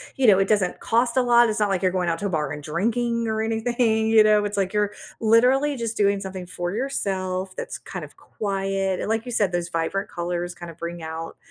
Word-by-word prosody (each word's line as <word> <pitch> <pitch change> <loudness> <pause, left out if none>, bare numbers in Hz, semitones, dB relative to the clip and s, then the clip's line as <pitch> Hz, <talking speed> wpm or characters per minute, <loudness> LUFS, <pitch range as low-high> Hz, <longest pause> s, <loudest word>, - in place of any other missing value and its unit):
you 265 -2 +2
know, 195 -3 +7
it 195 - +2
doesn't 195 -4 +1
cost 235 +2 +1
a - - +6
lot, 240 -1 +5
it's 215 0 -1
not 210 - +2
like 190 -2 0
you're 185 - +2
going 180 -2 0
out 165 - -1
to 205 - -4
a - - -3
bar, 150 -4 -1
and 150 - -5
drinking, 230 +9 -1
or 220 0 -1
anything, 225 0 +1
you 220 -1 +7
know? 210 -1 +4
It's 205 0 -3
like 195 0 0
you're, 210 -1 +1 0.3
literally, 255 +6 +4
just 230 -1 -3
doing 200 -1 +3
something 190 -2 -6
for 175 0 -4
yourself 190 -6 -2
that's - - -5
kind - - -7
of - - -17
quiet, 195 -2 -2
and, - - -3
like 225 +2 0
you 245 - -6
said 205 -5 +1
those 175 -1 -2
vibrant 170 +4 -2
colors 175 0 -3
kind 175 -1 -8
of 165 - -17
bring 170 0 -6
out 160 +1 -6
200 Hz, 240 wpm, -24 LUFS, 180-225 Hz, 0.3 s, know